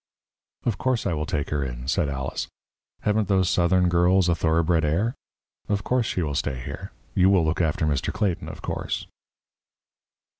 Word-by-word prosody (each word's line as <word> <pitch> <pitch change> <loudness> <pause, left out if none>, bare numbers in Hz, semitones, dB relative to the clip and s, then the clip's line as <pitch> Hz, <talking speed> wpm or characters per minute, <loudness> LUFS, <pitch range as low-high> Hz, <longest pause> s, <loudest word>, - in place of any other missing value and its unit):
"Of 115 - 0
course, 130 -3 0
I - - +1
will 75 -1 -2
take 75 -2 -2
her 75 -1 0
in," 60 -1 -5
said 70 +2 +1
Alice. 70 0 -3 0.5
"Haven't 105 -1 +1
those 95 -2 +2
Southern 90 +1 +3
girls 90 +1 +4
a - - +4
thoroughbred 80 0 +2
air? 90 +11 +1 0.6
Of 100 -1 0
course, 125 0 +1
she 90 - -1
will 75 -2 -2
stay 65 -2 -1
here. 60 - -7 0.2
You 95 +1 +4
will 95 -4 +4
look 80 +2 +1
after 80 -1 +1
Mr. 70 -3 0
Clayton, 105 -5 -1
of - - -9
course." - - -3
85 Hz, 175 wpm, -25 LUFS, 75-95 Hz, 0.6 s, girls